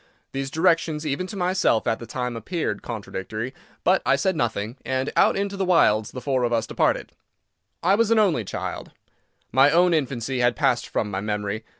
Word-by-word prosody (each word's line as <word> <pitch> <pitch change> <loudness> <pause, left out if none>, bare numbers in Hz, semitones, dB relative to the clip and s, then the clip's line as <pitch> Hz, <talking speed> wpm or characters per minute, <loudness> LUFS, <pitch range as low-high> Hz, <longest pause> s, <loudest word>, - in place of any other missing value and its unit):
These 135 0 -3
directions, 160 -1 +1
even 150 +5 -2
to 205 - -8
myself, 180 - +1
at 115 -1 0
the 115 - -9
time, 125 -1 -3
appeared 160 - -3
contradictory. 110 +2 -5 0.3
But 185 +2 +3
I - - +3
said 190 -2 0
nothing. 115 -2 -2
And 130 +1 -1
out - - +4
into 200 0 -2
the 195 - -1
wilds 110 - +3
the 125 - -8
four 130 -2 0
of 120 -1 0
us 115 -1 +1
departed. - - 0 0.7
I 185 +3 +4
was 225 +1 +3
an 230 - +4
only 185 - +3
child. 95 - -5 0.6
My 135 +4 +6
own 175 +2 +4
infancy 135 -4 -1
had 120 -1 +3
passed - - +1
from 105 - -2
my 95 0 -2
memory. 105 +1 -3
130 Hz, 190 wpm, -24 LUFS, 115-175 Hz, 0.7 s, My